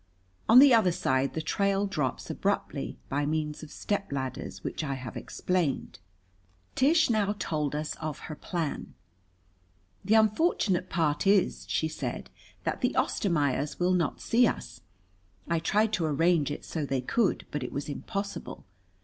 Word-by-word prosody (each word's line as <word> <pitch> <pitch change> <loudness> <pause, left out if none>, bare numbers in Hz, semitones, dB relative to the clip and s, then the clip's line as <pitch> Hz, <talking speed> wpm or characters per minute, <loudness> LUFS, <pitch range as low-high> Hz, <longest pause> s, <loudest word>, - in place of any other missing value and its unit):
On 230 - +8
the 270 0 +9
other 220 -6 +5
side 130 -4 0
the 160 - -2
trail 200 +4 +1
drops 150 -10 -2
abruptly, - - -2
by 145 +2 -1
means 150 0 -2
of 155 - -10
stepladders 140 - -3
which - - -3
I 140 -3 -2
have 125 -2 -7
explained. 170 - -2 0.7
Tish 295 0 +4
now 210 -2 +1
told 150 -5 -2
us 150 +1 -2
of 155 -3 -4
her 160 - -6
plan. 160 0 -4 1.1
"The 210 +3 +3
unfortunate 215 - +2
part 160 +1 0
is," 195 -2 +2
she 160 - +1
said, 155 - -5 0.3
"that - - -2
the - - +1
Ostermaiers 145 -6 0
will 180 +1 +3
not 175 -4 0
see 235 +1 +4
us. 120 - -5 0.7
I 170 -1 +1
tried 210 +6 +1
to 180 -5 +1
arrange 160 0 +2
it - - -5
so 160 - -3
they 135 -2 -1
could, 200 - 0
but 150 - -3
it 125 - -4
was 140 - -4
impossible. 200 +7 -5
165 Hz, 150 wpm, -28 LUFS, 145-200 Hz, 1.1 s, the